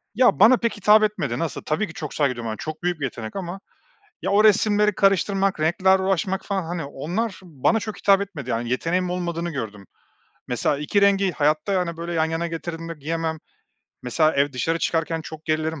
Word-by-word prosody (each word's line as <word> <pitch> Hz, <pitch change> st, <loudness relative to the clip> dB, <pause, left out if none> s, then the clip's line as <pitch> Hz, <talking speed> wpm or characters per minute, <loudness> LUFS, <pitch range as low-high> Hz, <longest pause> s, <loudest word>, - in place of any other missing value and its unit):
Ya, 245 Hz, -, +4 dB
bana 235 Hz, +4 st, +7 dB
pek 230 Hz, -2 st, -2 dB
hitap 210 Hz, +2 st, +5 dB
etmedi. 150 Hz, -, -1 dB
Nasıl? 165 Hz, -, -3 dB
Tabii 185 Hz, +7 st, -1 dB
ki 160 Hz, -, -11 dB
çok 150 Hz, -3 st, -6 dB
saygı 140 Hz, -4 st, +1 dB
duyuyorum 115 Hz, -2 st, -5 dB
çok 155 Hz, +1 st, -6 dB
büyük 175 Hz, -2 st, -1 dB
bir 145 Hz, -, -1 dB
yetenek. 115 Hz, -, -6 dB
Ama 190 Hz, 0 st, -5 dB, 0.6 s
ya, -, -, -1 dB
o 210 Hz, +2 st, +4 dB
resimleri 210 Hz, 0 st, +4 dB
karıştırmak, 195 Hz, -1 st, +2 dB
renklerle 190 Hz, +4 st, +3 dB
uğraşmak 190 Hz, +1 st, 0 dB
falan, 195 Hz, -2 st, -1 dB
hani, 165 Hz, -2 st, -4 dB
onlar 185 Hz, +10 st, -3 dB
bana 170 Hz, -, 0 dB
çok 215 Hz, 0 st, -6 dB
hitap 200 Hz, -1 st, +4 dB
etmedi. 160 Hz, -10 st, -6 dB
Yani 115 Hz, 0 st, -2 dB
yeteneğim 175 Hz, +8 st, 0 dB
olmadığını 175 Hz, -1 st, -2 dB
gördüm. 110 Hz, -, -6 dB, 0.6 s
Mesela 125 Hz, +4 st, 0 dB
2 150 Hz, +7 st, +1 dB
rengi 195 Hz, -2 st, +3 dB
hayatta, 155 Hz, +5 st, +1 dB
yani, 180 Hz, -3 st, -1 dB
böyle 170 Hz, +1 st, -5 dB
yan 160 Hz, -1 st, +2 dB
yana 165 Hz, +1 st, -2 dB
getirdiğimde 165 Hz, 0 st, -5 dB
giyemem. 160 Hz, +1 st, -3 dB, 0.6 s
Mesela 155 Hz, +6 st, +2 dB
ev 140 Hz, 0 st, +2 dB
dışarı 165 Hz, +6 st, -1 dB
çıkarken 165 Hz, 0 st, -1 dB
çok 155 Hz, 0 st, -10 dB
gerilirim. 155 Hz, 0 st, -1 dB
165 Hz, 185 wpm, -23 LUFS, 155-195 Hz, 0.6 s, bana